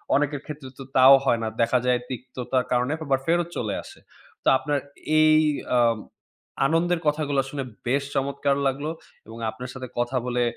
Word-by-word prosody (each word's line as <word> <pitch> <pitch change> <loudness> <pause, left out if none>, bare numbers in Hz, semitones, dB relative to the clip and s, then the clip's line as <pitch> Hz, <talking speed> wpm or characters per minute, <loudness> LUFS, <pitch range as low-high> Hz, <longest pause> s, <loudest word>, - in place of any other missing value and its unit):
অনেকের 145 0 0
ক্ষেত্রে 150 -3 -8
তো 135 - -6
তাও 130 +1 +9
হয় 120 -3 +3
না। - - -1
দেখা 115 +2 +3
যায়, 125 -1 +3
তিক্ততার 125 0 -3
কারণে 125 +2 +1
আবার 135 -1 +1
ফেরত 170 +1 +2
চলে 110 -4 -2
আসে। - - -13 0.4
তো - - -4
আপনার 145 +1 -1 0.4
এই 155 0 +6 0.4
অ্যা 125 -1 +3 0.9
আনন্দের 165 +2 +1
কথাগুলো 145 -2 +1
শুনে, 140 -1 -4 0.2
বেশ 140 +3 +1
চমৎকার 140 +1 0
লাগলো 140 +3 -2 0.4
এবং 115 +1 -10
আপনার 120 +3 -7
সাথে 130 -1 -7
কথা 120 +2 0
বলে 125 -1 0
135 Hz, 165 wpm, -25 LUFS, 125-145 Hz, 0.9 s, তাও